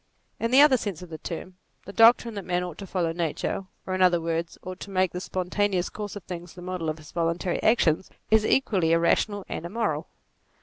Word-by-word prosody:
In 230 - 0
the 260 +3 +7
other 290 -3 +7
sense 195 -7 -4
of 175 - -12
the 160 - -6
term, 180 +2 -7 0.3
the 200 - -9
doctrine 230 +1 +6
that 200 -2 -5
man 180 0 -1
ought 175 -3 -7
to 195 - -7
follow 175 -3 0
nature, 170 +3 -2 0.2
or 185 - -3
in 185 - -1
other 180 -2 +5
words, 165 0 -3
ought 185 +1 -7
to - - -8
make 185 -2 +1
the 180 - -5
spontaneous 185 0 -1
course 210 -1 -6
of 205 - -7
things 175 -1 -8
the 180 - -10
model 180 -3 -3
of 155 - -3
his 155 -1 -13
voluntary 170 +1 -1
actions, 190 -7 +3 0.2
is 220 -1 +5
equally 190 -9 +2
irrational 195 +4 +2
and - - -5
im 170 - -7
moral. 230 -1 -1
185 Hz, 220 wpm, -26 LUFS, 170-205 Hz, 0.3 s, the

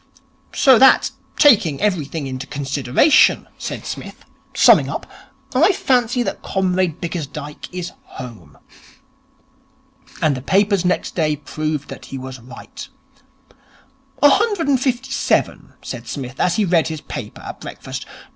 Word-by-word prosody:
'So 260 -5 +5
that 265 0 +6 0.3
taking 210 - +5
everything 165 -7 -1
into 130 0 -6
consideration,' 140 - +3
said - - -5
Psmith, - - -8 0.3
summing - - +6
up, - - -4 0.5
'I 320 +10 +4
fancy 245 -5 +1
that - - -4
Comrade 185 -3 0
Bickersdyke 150 -4 -6
is 180 -1 -5 0.3
home.' 110 - -10 1.6
And 155 -5 +2
the 130 - -6
papers 195 +4 +2
next 180 0 0
day 155 -3 +1
proved 150 0 -4
that - - -9
he 135 - -7
was 130 0 -8
right. 135 - -11 1.4
'A 290 - +9
hundred 405 -1 +1
and 270 -3 +2
fifty 260 0 -1
seven,' 270 - 0
said - - -7
Psmith, 130 -2 -6
as 175 -1 +2
he 210 - +2
read 170 -3 +2
his 160 -2 -5
paper - - -8
at - - -8
breakfast. - - -7
175 Hz, 135 wpm, -20 LUFS, -, 1.6 s, A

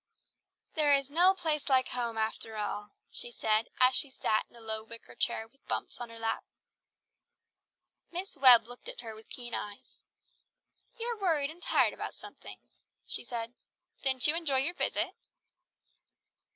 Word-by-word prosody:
"There 295 -2 +5
is 275 0 -2
no 360 +5 +5
place 315 -6 -1
like 260 -1 +4
home 235 -2 -2
after 220 0 -2
all," 210 0 -3 0.2
she - - -7
said 220 -1 +1
as 255 0 +6
she 285 - +3
sat 220 -4 0
in - - -22
a - - -13
low 220 -1 -3
wicker 230 +1 -10
chair 225 - -1
with 275 +4 -34
Bumps - - -3
on 240 - -5
her 230 - -10
lap. 225 0 -1 1.7
Miss 360 +2 -5
Webb 250 -5 +8
looked 245 +1 -10
at - - -7
her 225 -2 -7
with 220 0 -14
keen 240 -2 -7
eyes. 205 -1 -6 1.0
"You 460 - -4
are 470 - -2
tired 315 -7 +1
and 345 +2 -13
worried - - +5
about - - -5
something," - - -11 0.5
she - - -4
said. 235 -1 -5 0.5
"Didn't 265 -2 +2
you 300 - +6
enjoy 315 -5 +1
your 335 +6 0
visit?" - - +1
250 Hz, 165 wpm, -31 LUFS, 225-300 Hz, 1.7 s, Webb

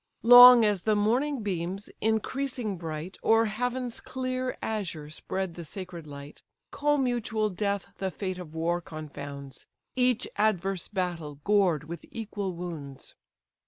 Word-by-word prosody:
Long 245 0 +10
as 205 -3 +1
the 215 +2 +2
morning 245 +5 +1
beams, 190 0 -3
increasing 220 +1 -1
bright, 165 +1 -6
O'er 225 0 +4
heaven's 245 +2 -2
clear 255 0 -3
azure 170 -9 -4
spread 190 +3 -3
the 170 - -8
sacred 175 -1 -8
light, 140 0 -10 0.3
Commutual 245 -8 0
death 200 0 -2
the 190 0 -1
fate 185 +1 -4
of 160 -3 -9
war 170 +2 0
confounds, 145 -4 -8 0.3
Each 250 -1 +2
adverse 195 -3 0
battle 175 -6 -3
gored 195 -7 +3
with 170 +3 -8
equal 205 -4 -4
wounds. 155 -6 -7
195 Hz, 125 wpm, -28 LUFS, 170-225 Hz, 0.3 s, Long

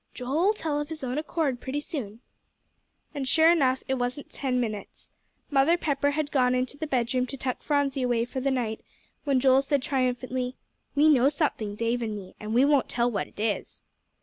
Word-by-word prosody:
"Joe'll 305 +11 +1
tell 295 -6 -2
of 295 - -6
his 315 -3 -6
own 255 +3 -1
accord, 305 -5 -1
pretty 275 +2 -3
soon." 245 - -6 0.9
And 280 -3 -3
sure 320 +4 +5
enough, 265 -6 +2
it 265 -1 -1
wasn't 245 +3 -3
ten 255 -2 -1
minutes. 215 -4 -5 0.4
Mother 290 +5 +4
Pepper 285 -3 0
had 295 0 -2
gone 255 -2 +3
into 255 +2 -1
the 310 +2 -4
bedroom 255 -1 0
to 275 - -6
tuck 255 -1 -3
Phronsie 285 -2 0
away 240 -2 +1
for 260 - -5
the 275 +2 0
night, 235 -5 -1 0.4
when 275 -3 +3
Joel 265 +1 +5
said 275 -1 0
triumphantly, 255 -1 -1 0.4
"We 295 +2 +5
know 275 -3 +5
something, 255 -9 -1
Dave 230 +2 -1
and 220 -2 -2
me, 185 -2 -10
and 210 0 -6
we 255 +3 +6
won't 285 -2 +3
tell 240 0 +1
what 205 - -4
'tis." 215 -1 -3
260 Hz, 190 wpm, -27 LUFS, 245-285 Hz, 0.9 s, we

